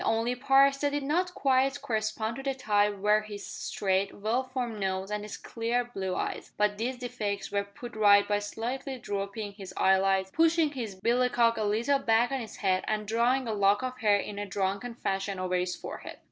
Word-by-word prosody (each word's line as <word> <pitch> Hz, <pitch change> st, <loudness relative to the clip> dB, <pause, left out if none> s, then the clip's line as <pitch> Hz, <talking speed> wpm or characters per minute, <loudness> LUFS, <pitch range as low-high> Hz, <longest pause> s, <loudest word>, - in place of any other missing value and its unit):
The -, -, -2 dB
only 225 Hz, +2 st, +1 dB
parts 275 Hz, +2 st, +4 dB
that 285 Hz, 0 st, 0 dB
did 290 Hz, -1 st, -1 dB
not 360 Hz, +6 st, 0 dB
quite 270 Hz, +1 st, +2 dB
correspond 220 Hz, -3 st, -2 dB
to -, -, -5 dB
the 270 Hz, 0 st, -2 dB
type 210 Hz, -4 st, +1 dB
were 210 Hz, +2 st, +3 dB
his 205 Hz, -1 st, -8 dB
straight, 195 Hz, 0 st, -1 dB
well 220 Hz, +5 st, 0 dB
formed 250 Hz, -4 st, -4 dB
nose 190 Hz, 0 st, -2 dB
and 210 Hz, 0 st, -2 dB
his 210 Hz, 0 st, -7 dB
clear 235 Hz, +1 st, -1 dB
blue 195 Hz, -6 st, -4 dB
eyes, -, -, -4 dB
but 210 Hz, 0 st, +1 dB
these 250 Hz, +3 st, -2 dB
defects 215 Hz, -5 st, -4 dB
were 200 Hz, 0 st, +1 dB
put 235 Hz, +4 st, -10 dB
right 205 Hz, -1 st, +6 dB
by 205 Hz, 0 st, +1 dB
slightly 250 Hz, +6 st, -4 dB
drooping 205 Hz, -1 st, -4 dB
his 195 Hz, -2 st, -10 dB
eyelids, 190 Hz, 0 st, +3 dB
pushing 325 Hz, -1 st, +3 dB
his 230 Hz, -8 st, -5 dB
billycock 235 Hz, +1 st, +3 dB
a 220 Hz, -, -2 dB
little 230 Hz, +7 st, +2 dB
back 235 Hz, -1 st, +2 dB
on 270 Hz, -, -1 dB
his 225 Hz, -3 st, -7 dB
head, 190 Hz, -2 st, +1 dB
and 215 Hz, -1 st, -1 dB
drawing 240 Hz, +4 st, +2 dB
a 220 Hz, -, -1 dB
lock 205 Hz, +2 st, +3 dB
of 255 Hz, 0 st, -4 dB
hair 210 Hz, -3 st, +4 dB
in 205 Hz, 0 st, -5 dB
a 205 Hz, -, -3 dB
drunken 200 Hz, +4 st, -2 dB
fashion 195 Hz, -2 st, -2 dB
over 185 Hz, 0 st, -2 dB
his 180 Hz, 0 st, 0 dB
forehead. -, -, -8 dB
220 Hz, 200 wpm, -29 LUFS, 200-250 Hz, -, right